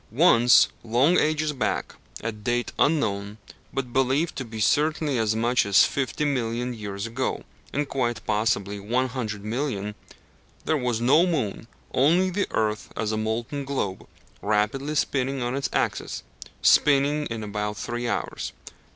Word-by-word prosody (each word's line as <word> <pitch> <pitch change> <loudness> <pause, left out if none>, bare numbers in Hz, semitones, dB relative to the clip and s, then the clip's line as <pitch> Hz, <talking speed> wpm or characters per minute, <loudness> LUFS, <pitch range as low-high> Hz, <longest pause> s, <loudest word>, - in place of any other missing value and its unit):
Once, 120 -2 +6 0.2
long 125 +9 +3
ages 155 0 +1
back, 130 - -2 0.3
at 110 -2 -5
date 120 +1 0
unknown, 105 -9 +1 0.3
but 125 -3 -4
believed 135 +5 +1
to 130 - -3
be 110 -2 -8
certainly 150 +3 +2
as 110 -1 +1
much 120 +2 +2
as 100 -1 +5
fifty 140 +2 -2
million 125 -3 -1
years 100 -2 -5
ago, 115 +3 -2 0.3
and 145 0 -1
quite 120 -5 -1
possibly 105 -2 0
one 125 +6 0
hundred 110 -5 -4
million, 110 -4 -2 0.7
there 160 - +2
was 125 -5 -1
no 140 +9 +4
moon, 115 - -2 0.3
only 170 +8 +3
the 200 +2 0
earth 105 -1 -1
as 110 -1 -1
a - - -1
molten 115 +6 -2
globe, 130 -9 -3 0.3
rapidly 110 +8 0
spinning 135 -2 0
on 120 +2 -1
its 140 - -1
axis 65 - -2 0.4
spinning 145 +1 +4
in 115 -1 -5
about 105 0 -3
three 120 +2 -3
hours. - - -3
120 Hz, 145 wpm, -25 LUFS, 110-140 Hz, 0.7 s, Once